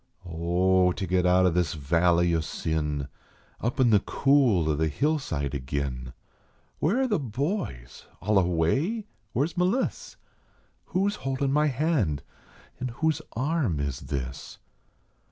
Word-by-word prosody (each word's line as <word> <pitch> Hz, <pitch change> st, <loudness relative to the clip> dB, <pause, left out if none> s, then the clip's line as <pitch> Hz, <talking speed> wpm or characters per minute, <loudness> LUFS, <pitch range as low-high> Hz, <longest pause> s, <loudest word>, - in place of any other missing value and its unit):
"Oh, 90 Hz, +2 st, +2 dB
to 95 Hz, -, -3 dB
get 90 Hz, 0 st, +2 dB
out 90 Hz, +1 st, +4 dB
o 90 Hz, -, +4 dB
this 85 Hz, -2 st, 0 dB
valley 85 Hz, +3 st, +2 dB
o 80 Hz, -, +2 dB
sin 75 Hz, -2 st, -2 dB, 0.5 s
Up 120 Hz, +3 st, -2 dB
in 125 Hz, -3 st, +5 dB
the 105 Hz, -, +6 dB
cool 130 Hz, -, +3 dB
o 75 Hz, -, +2 dB
the 80 Hz, +2 st, +1 dB
hillside 80 Hz, -, -1 dB
agin! 65 Hz, -2 st, -3 dB, 0.7 s
Where 205 Hz, -, +2 dB
are 265 Hz, -, +2 dB
the 210 Hz, -7 st, +1 dB
boys? 130 Hz, -, -4 dB
All 105 Hz, 0 st, +3 dB
away? 95 Hz, -, +1 dB, 0.3 s
Where 140 Hz, -, +2 dB
s 170 Hz, -, -6 dB
M 180 Hz, -, +4 dB
liss? 255 Hz, +7 st, -2 dB, 0.7 s
Who 190 Hz, +2 st, 0 dB
s 205 Hz, -, -2 dB
holdin 135 Hz, +1 st, -1 dB
my 150 Hz, +1 st, +3 dB
hand, 130 Hz, -, 0 dB, 0.6 s
an 130 Hz, -, -2 dB
whose 155 Hz, +5 st, -1 dB
arm 130 Hz, -, 0 dB
is 70 Hz, -3 st, -2 dB
this? 65 Hz, -2 st, -5 dB
95 Hz, 145 wpm, -27 LUFS, -, 0.7 s, the